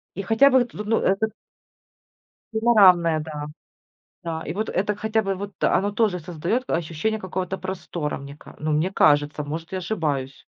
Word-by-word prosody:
И - - -3
хотя 225 +7 +5
бы, 255 -2 +4
тут, 210 -3 -8
ну, 225 +2 +2
это 195 +3 +1 1.3
Панорамные, 185 -8 +5
да. 150 -1 -6 0.8
Да, 165 -1 -3
и 160 - -3
вот 215 +3 -2
это, 205 +2 0
хотя 220 +1 0
бы 195 -2 -2
вот 200 +1 -7
оно 205 +1 +2
тоже 205 -4 +1
создает 175 +9 -2
к - - -6
ощущение 170 +7 -1
какого-то 185 -1 -3
простора, 175 -5 -4
мне 140 0 -10
ка - - -15
ну, 155 +1 -1
мне 155 +5 +1
кажется. 145 -3 +3
Может, 160 +3 -6
я 190 - -2
ошибаюсь. 155 -9 -3
185 Hz, 170 wpm, -24 LUFS, 155-210 Hz, 1.3 s, хотя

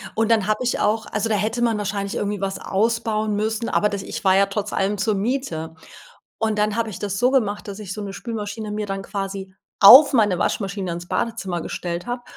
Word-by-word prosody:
Und 225 0 +1
dann 215 -4 +3
habe 215 - +1
ich 250 - 0
auch 220 +1 +1
also, 210 +2 -2
da 215 - +2
hätte 220 +4 -1
man 230 -2 +2
wahrscheinlich 200 -1 -3
irgendwie 205 -1 -2
was 195 -1 -3
ausbauen 220 0 0
müssen, 220 +2 -1
aber 210 - +2
das 200 -1 -4
ich - - -6
war 190 -1 +4
ja 200 - +5
trotz 205 +1 -4
allem 195 +2 0
zur 210 +2 0
Miete. 195 -8 -3 0.6
Und 220 -1 -1
dann 210 0 +1
habe 230 -1 0
ich 185 - -7
das 200 -1 -3
so 245 +3 +3
gemacht, 215 -7 0
dass 200 0 -6
ich 195 -3 -6
so 210 - -6
'ne 200 -1 -6
Spülmaschine 215 -1 -5
mir 210 0 -3
dann 195 -1 -4
quasi 195 -1 -5 0.3
auf 270 +8 +10
meine 210 -8 +3
Waschmaschine 195 -3 -2
ins 175 +1 -7
Badezimmer 195 -7 -2
gestellt 175 +2 -5
habe. 245 0 -4
210 Hz, 220 wpm, -22 LUFS, 195-225 Hz, 0.6 s, auf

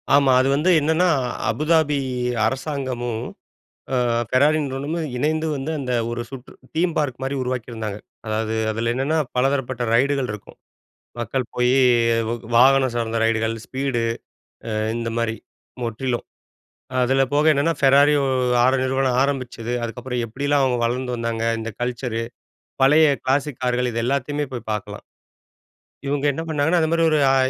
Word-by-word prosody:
ஆமா. 140 -2 +4
அது 130 - +1
வந்து 155 +6 +1
என்னன்னா, 160 +4 +2 0.4
அபுதாபி 155 +3 +2 0.5
அரசாங்கமும், 130 -3 -3 0.7
அ - - +2 0.3
ஃபெராரி 145 +4 +3
நிறுவனமும் 145 +4 -3
இணைந்து 155 +3 0
வந்து 140 +3 -3
அந்த 125 -2 -3 0.2
ஒரு 120 0 -3
சுற்று 130 -2 -10 0.2
தீம் 170 0 +1
பார்க் 135 -4 -1
மாரி 135 +1 -2
உருவாக்கியிருந்தாங்க. 115 -4 -4 0.3
அதாவது 110 +1 -1 0.2
அதில 115 +2 -1
என்னென்ன 135 +6 0 0.2
பலதரப்பட்ட 130 -1 0
ரைடுகள் 135 -1 +1
இருக்கும். 105 -1 -10 0.6
மக்கள் 120 +2 -2
போய் 125 0 +2 0.6
வ - - -1 0.2
வாகனம் 130 +1 +5
சார்ந்த 115 -1 -1
ரைடுகள், 115 0 0
ஸ்பீடு 130 -3 -2 0.7
அ - - -3 0.3
இந்த 115 0 -3
மாதிரி 115 -1 0 0.5
முற்றிலும். 120 +1 -2 0.8
அதில 135 +2 +3
போக 150 +1 +3
என்னன்னா, 150 +3 +1
ஃபெராரியோ, 140 +1 +5 0.4
6 130 +1 +4
நிறுவனம் 130 -1 +1
ஆரம்பிச்சது, 125 -4 -3
அதுக்கப்புறம் 120 +1 -3
எப்பிடியெல்லாம் 140 +5 0
அவுங்க 125 -2 +1
வளர்ந்து 125 +1 -1
வந்தாங்க, 115 -1 -2 0.2
இந்த 115 +1 -4
கல்ச்சரு 120 -1 -2 0.6
பழைய 150 +4 +6 0.2
கிளாசிக் 135 0 -1
கார்கள், 125 0 0
இது 115 +1 -2
எல்லாத்தையுமே 140 +3 -1
போய் 120 -3 -6
பார்க்கலாம். 105 -3 -5 1.0
இவுங்க 145 0 -1
என்ன 160 - -4
பண்ணாங்கன்னா, 160 +3 +2
அந்த 160 - +1
மாரி 165 0 +2
ஒரு 155 - +3
அ - - +4
130 Hz, 135 wpm, -22 LUFS, 120-145 Hz, 1.0 s, பழைய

